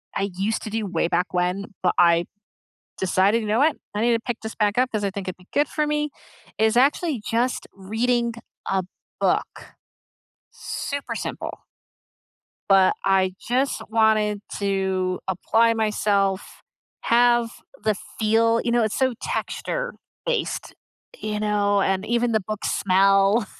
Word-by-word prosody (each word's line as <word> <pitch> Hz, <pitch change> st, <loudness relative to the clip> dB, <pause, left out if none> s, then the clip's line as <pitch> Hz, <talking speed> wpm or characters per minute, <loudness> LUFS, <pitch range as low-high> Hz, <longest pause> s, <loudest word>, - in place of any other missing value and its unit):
I 200 Hz, -, 0 dB
used 205 Hz, +4 st, -1 dB
to -, -, -5 dB
do 220 Hz, 0 st, -2 dB
way 185 Hz, -3 st, 0 dB
back 180 Hz, +2 st, 0 dB
when, 180 Hz, +2 st, 0 dB, 0.2 s
but 180 Hz, -, +3 dB
I 170 Hz, 0 st, +5 dB, 0.7 s
decided, 190 Hz, +4 st, +2 dB
"You 215 Hz, -, -4 dB
know 215 Hz, +2 st, +2 dB
what, 300 Hz, +3 st, +3 dB, 0.2 s
I 205 Hz, -, -1 dB
need 235 Hz, +2 st, +3 dB
to 230 Hz, -, +1 dB
pick 240 Hz, -1 st, -4 dB
this 220 Hz, 0 st, -6 dB
back 210 Hz, 0 st, +1 dB
up 255 Hz, 0 st, +3 dB
'cause 215 Hz, -3 st, -2 dB
I 200 Hz, -, 0 dB
think 195 Hz, 0 st, -6 dB
it'd 185 Hz, -, -4 dB
be 180 Hz, 0 st, -21 dB
good 290 Hz, 0 st, +2 dB
for 305 Hz, -, 0 dB
me," 300 Hz, 0 st, 0 dB, 0.5 s
is 220 Hz, +1 st, +3 dB
actually, 280 Hz, +1 st, +2 dB
just, 240 Hz, +2 st, 0 dB
reading 235 Hz, +4 st, -1 dB, 0.3 s
a 190 Hz, -1 st, +1 dB, 0.4 s
book, -, -, -1 dB, 0.8 s
super 285 Hz, 0 st, -5 dB
simple. -, -, -5 dB, 1.1 s
But 195 Hz, -1 st, +6 dB
I 190 Hz, -1 st, +2 dB, 0.2 s
just 260 Hz, +3 st, +1 dB
wanted 215 Hz, -2 st, +2 dB, 0.2 s
to 190 Hz, -2 st, 0 dB
apply 225 Hz, +5 st, +2 dB
myself, 205 Hz, -3 st, 0 dB, 0.4 s
have 240 Hz, 0 st, +3 dB, 0.3 s
the 215 Hz, -1 st, +2 dB, 0.2 s
feel, 230 Hz, +1 st, +3 dB
you 235 Hz, -, 0 dB
know, 240 Hz, -1 st, +3 dB
it's 215 Hz, -, -1 dB
so 260 Hz, -2 st, +2 dB
texture-based, -, -, -3 dB, 0.5 s
you 210 Hz, -1 st, -3 dB
know, 205 Hz, -1 st, +2 dB
and 195 Hz, +1 st, 0 dB
even 235 Hz, 0 st, +1 dB
the 220 Hz, -, +3 dB
book 215 Hz, -1 st, -5 dB
smell. 195 Hz, +3 st, +3 dB
215 Hz, 150 wpm, -23 LUFS, 195-235 Hz, 1.1 s, But